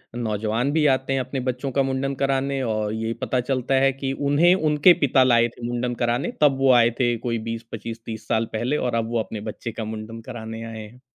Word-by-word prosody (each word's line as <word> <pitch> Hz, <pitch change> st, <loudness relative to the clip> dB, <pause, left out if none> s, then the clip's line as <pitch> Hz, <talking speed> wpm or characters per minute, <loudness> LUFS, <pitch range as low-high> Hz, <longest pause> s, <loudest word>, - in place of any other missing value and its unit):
नौजवान 110 Hz, +2 st, -1 dB
भी 155 Hz, -1 st, +2 dB
आते 130 Hz, +1 st, -2 dB
हैं 135 Hz, -, +1 dB
अपने 130 Hz, +1 st, -3 dB
बच्चों 130 Hz, +2 st, -2 dB
का 135 Hz, +1 st, +2 dB
मुंडन 135 Hz, +1 st, -1 dB
कराने 135 Hz, 0 st, 0 dB
और 110 Hz, -2 st, -1 dB
यही 110 Hz, +1 st, -2 dB
पता 130 Hz, -, 0 dB
चलता 130 Hz, +1 st, -1 dB
है 135 Hz, 0 st, +4 dB
कि 135 Hz, 0 st, -3 dB, 0.2 s
उन्हें 165 Hz, +5 st, +5 dB
उनके 155 Hz, 0 st, +5 dB
पिता 135 Hz, -1 st, +4 dB
लाए 120 Hz, -2 st, +4 dB
थे 120 Hz, -, -7 dB
मुंडन 120 Hz, 0 st, -2 dB
कराने 120 Hz, +2 st, 0 dB
तब 145 Hz, -3 st, +5 dB
वो 135 Hz, -1 st, +5 dB
आए 120 Hz, -1 st, +5 dB
थे 120 Hz, -2 st, +2 dB
कोई 115 Hz, 0 st, -2 dB
20-25-30 115 Hz, -1 st, -7 dB
साल 110 Hz, +1 st, +1 dB
पहले 120 Hz, +7 st, 0 dB
और 125 Hz, -4 st, -1 dB
अब 115 Hz, -1 st, -1 dB
वो 120 Hz, -, +1 dB
अपने 110 Hz, 0 st, -4 dB
बच्चे 115 Hz, -, -7 dB
का 115 Hz, -, -5 dB
मुंडन 110 Hz, +1 st, -7 dB
कराने 115 Hz, -2 st, -7 dB
आए 115 Hz, -1 st, -7 dB
हैं। 110 Hz, +4 st, -13 dB
120 Hz, 215 wpm, -23 LUFS, 115-135 Hz, 0.2 s, उन्हें